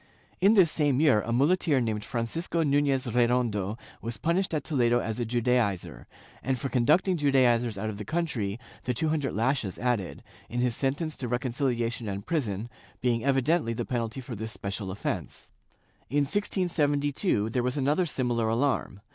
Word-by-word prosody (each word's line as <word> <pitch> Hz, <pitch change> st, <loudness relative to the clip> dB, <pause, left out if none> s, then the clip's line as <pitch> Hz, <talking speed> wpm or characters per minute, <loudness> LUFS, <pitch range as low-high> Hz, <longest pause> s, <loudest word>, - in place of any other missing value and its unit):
In 200 Hz, +4 st, +5 dB
this 180 Hz, -6 st, +6 dB
same 145 Hz, -4 st, +2 dB
year 145 Hz, -9 st, +4 dB
a 115 Hz, -, -4 dB
muleteer 145 Hz, +3 st, +3 dB
named 110 Hz, -3 st, -1 dB
Francisco 160 Hz, +8 st, -2 dB
Nunez 140 Hz, -2 st, +2 dB
Redondo 120 Hz, -4 st, +1 dB, 0.2 s
was 115 Hz, 0 st, -5 dB
punished 180 Hz, +4 st, 0 dB
at 155 Hz, -3 st, -1 dB
Toledo 120 Hz, -6 st, +2 dB
as 110 Hz, 0 st, -3 dB
a 120 Hz, -, 0 dB
Judaizer, 120 Hz, -5 st, 0 dB, 0.3 s
and 130 Hz, +1 st, -1 dB
for 135 Hz, +3 st, -3 dB
conducting 155 Hz, +9 st, +3 dB
Judaizers 125 Hz, -6 st, +3 dB
out 110 Hz, +2 st, -3 dB
of 100 Hz, -, -9 dB
the -, -, -4 dB
country, 120 Hz, -, -2 dB, 0.3 s
the 125 Hz, -, -1 dB
two 155 Hz, +6 st, 0 dB
hundred 150 Hz, -3 st, -1 dB
lashes 115 Hz, -3 st, 0 dB
added, 120 Hz, -7 st, -2 dB, 0.3 s
in 120 Hz, -, -3 dB
his 125 Hz, -2 st, +1 dB
sentence 145 Hz, +5 st, -1 dB
to 125 Hz, -, -4 dB
reconciUation 120 Hz, -3 st, -1 dB
and 100 Hz, +1 st, -5 dB
prison, 115 Hz, -, -1 dB, 0.3 s
being 120 Hz, -2 st, 0 dB
evidently 135 Hz, -1 st, +2 dB
the -, -, -3 dB
penalty 120 Hz, 0 st, -3 dB
for 125 Hz, 0 st, -8 dB
this 110 Hz, +2 st, -5 dB
special 100 Hz, -1 st, -5 dB
offence/ 95 Hz, -, -4 dB, 0.6 s
In 145 Hz, +1 st, +2 dB
1672, 145 Hz, -, 0 dB
there 125 Hz, -, +1 dB
was 125 Hz, +3 st, -1 dB
another 150 Hz, +6 st, +2 dB
similar 120 Hz, -5 st, 0 dB
alarm. 115 Hz, -4 st, 0 dB
125 Hz, 165 wpm, -28 LUFS, 115-145 Hz, 0.6 s, this